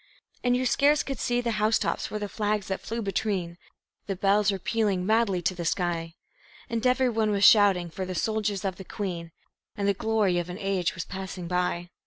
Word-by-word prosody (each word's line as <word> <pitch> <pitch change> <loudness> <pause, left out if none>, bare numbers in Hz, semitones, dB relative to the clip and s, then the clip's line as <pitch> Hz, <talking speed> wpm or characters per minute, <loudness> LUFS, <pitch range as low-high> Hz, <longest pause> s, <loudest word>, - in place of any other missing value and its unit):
And 245 0 +3
you 255 - -1
scarce 290 +4 +3
could 275 -3 -5
see 245 0 0
the 235 -1 -1
house 215 +1 +4
tops - - -2
for 215 - -4
the 210 -1 -3
flags 210 -1 -2
that 190 - -2
flew 230 0 -4
between; 190 -3 -2 0.5
The 195 - -2
bells 200 +2 +3
were 195 - -2
pealing 200 -2 0
madly 215 -4 +2
to 185 - +1
the 175 -1 -5
sky; 165 -1 -1 0.6
And 230 +1 +1
everyone 245 -4 +2
was 200 -1 +1
shouting 195 -6 +6
for 190 - -4
the 185 0 -4
Soldiers 210 -1 -1
of 190 -2 -2
the 190 - -8
Queen, 175 -5 -5 0.5
And 200 -1 0
the 200 - +4
glory 205 -3 +1
of 175 0 -4
an 180 - -5
age 195 -3 -1
was 170 - -4
passing 185 -2 -6
by. 175 0 -1
200 Hz, 205 wpm, -27 LUFS, 180-220 Hz, 0.6 s, shouting